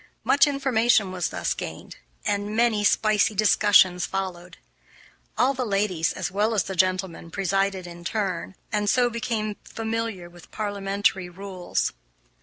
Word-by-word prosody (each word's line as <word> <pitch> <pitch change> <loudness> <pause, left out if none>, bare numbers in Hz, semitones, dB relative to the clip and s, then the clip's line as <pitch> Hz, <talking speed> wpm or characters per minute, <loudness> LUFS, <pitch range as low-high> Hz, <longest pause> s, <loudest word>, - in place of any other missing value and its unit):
Much 285 +2 +5
information 240 -7 +2
was 180 -1 -2
thus - - -1
gained, - - -8 0.3
and 205 +1 -1
many 225 -2 +2
spicy 215 +1 +3
discussions 195 -3 +4
followed. 180 -2 -4 0.8
All 265 +2 +3
the 255 -1 -2
ladies, 195 -6 0
as - - -4
well 210 +3 +1
as 200 - +2
the 190 +3 -5
gentlemen, 185 -2 0
presided 195 0 -1
in 175 0 -10
turn, 195 -1 -3 0.2
and 210 -1 0
so 245 +1 +3
became 225 -3 -2
familiar 225 -5 -4
with 175 -1 -16
parliamentary 200 -3 -1
rules. 185 0 -3
200 Hz, 135 wpm, -25 LUFS, 185-220 Hz, 0.8 s, Much